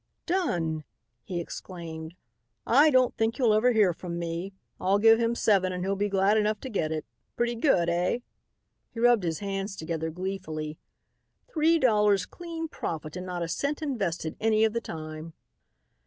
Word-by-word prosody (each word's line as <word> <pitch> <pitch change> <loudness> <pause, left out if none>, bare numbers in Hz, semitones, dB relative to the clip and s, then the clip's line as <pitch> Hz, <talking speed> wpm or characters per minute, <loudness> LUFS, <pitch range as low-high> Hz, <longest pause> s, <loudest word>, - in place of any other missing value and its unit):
"Done!" 170 - 0 0.4
he 175 -2 -4
exclaimed. 165 -2 -7 0.5
"I 285 +6 +6
don't 255 -3 +3
think 225 +1 0
you'll 240 -6 +4
ever 225 +4 +4
hear 210 -6 +4
from 170 0 -6
me. 170 +3 -3 0.3
I'll 190 +2 +2
give 225 +2 +6
him 235 0 +1
seven 195 -5 +3
and 180 0 -3
he'll 195 +1 0
be 205 +1 0
glad 195 +2 +3
enough 210 0 0
to 265 - -6
get 165 -9 -1
it. 155 -1 -3 0.3
Pretty 240 0 0
good, 230 - +2
eh?" 175 +5 +1 0.7
he 230 - -9
rubbed 240 -2 +5
his 165 -2 -1
hands 195 0 -3
together 160 -1 -3
gleefully. 160 -4 -5 0.7
"Three 330 -6 +3
dollars 210 - +3
clean 335 -2 -6
profit 155 - -5
and 180 0 -5
not 175 -1 -3
a - - -2
cent 285 - -2
invested 190 - -2
any 220 0 +3
of 220 -1 +3
the 235 - -1
time." 155 -2 -7
195 Hz, 170 wpm, -28 LUFS, 170-230 Hz, 0.7 s, I